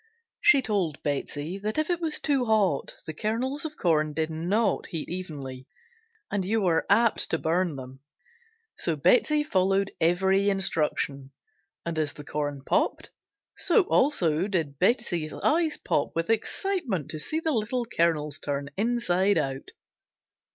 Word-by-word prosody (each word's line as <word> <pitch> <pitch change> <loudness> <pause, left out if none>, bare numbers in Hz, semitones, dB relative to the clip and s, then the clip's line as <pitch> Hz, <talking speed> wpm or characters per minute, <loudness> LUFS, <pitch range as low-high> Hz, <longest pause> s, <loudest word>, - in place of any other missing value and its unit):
She 280 -3 +6
told 190 -10 -1
Betsey 145 +5 -3
that 215 +5 -3
if 310 +3 +1
it 345 -1 -1
was 320 -2 0
too 275 -4 +1
hot 205 -10 +1
the 155 - -5
kernels 255 - -2
of 310 -1 -6
corn 155 -3 +1
did 160 +1 -1
not 190 +6 0
heat 165 -3 -5
evenly 140 -8 -6 0.6
and 200 -2 0
you 220 +5 +1
were 175 -5 +1
apt 225 +3 +3
to 160 - +1
burn 170 0 0
them; 130 0 -9 0.8
so 165 - -1
Betsey 295 - +3
followed 195 -5 +1
every 190 +4 +3
instruction, 150 -7 0 0.6
and 170 -1 -2
as 150 -2 -1
the 150 - -10
corn 145 -2 -3
popped - - 0 0.4
so 445 - +3
also 185 - +2
did 160 -9 -2
Betsey's 180 - +1
eyes 320 0 +1
pop - - -1
with 165 +6 0
excitement 230 - -1
to 155 - -5
see 310 - -2
the 320 -1 -1
little 235 0 -1
kernels 160 - 0
turn 140 -1 -3
inside 205 -4 +2
out. 135 0 -2
185 Hz, 145 wpm, -27 LUFS, 155-230 Hz, 0.8 s, She